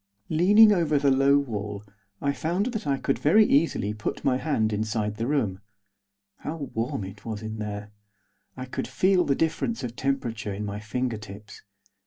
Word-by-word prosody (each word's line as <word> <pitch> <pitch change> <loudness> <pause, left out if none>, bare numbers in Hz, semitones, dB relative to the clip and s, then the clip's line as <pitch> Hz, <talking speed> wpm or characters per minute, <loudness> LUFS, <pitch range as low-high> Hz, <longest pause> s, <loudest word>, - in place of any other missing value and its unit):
Leaning 205 +7 +6
over 165 -6 +2
the 140 -1 +3
low 135 +1 +4
wall 105 -6 -3 0.4
I 140 0 +1
found 175 +7 -1
that 220 -9 -4
I 140 -1 +1
could 135 - -1
very 210 +9 +5
easily 140 - +2
put 105 0 -4
my 130 -2 +3
hand 110 -7 0
inside 105 0 -2
the 115 +2 -2
room. 110 -10 0 0.8
How 150 -2 -5
warm 115 -2 -2
it 95 +2 -9
was 110 -2 -5
in 110 0 -5
there! 105 0 -5 0.7
I 130 - -5
could 130 - -4
feel 185 -1 +3
the 140 - +2
difference 165 - -1
of 120 -1 -5
temperature 120 -7 -2
in 105 +1 -4
my 100 0 -4
fingertips. 110 -2 -5
125 Hz, 170 wpm, -26 LUFS, 105-150 Hz, 0.8 s, Leaning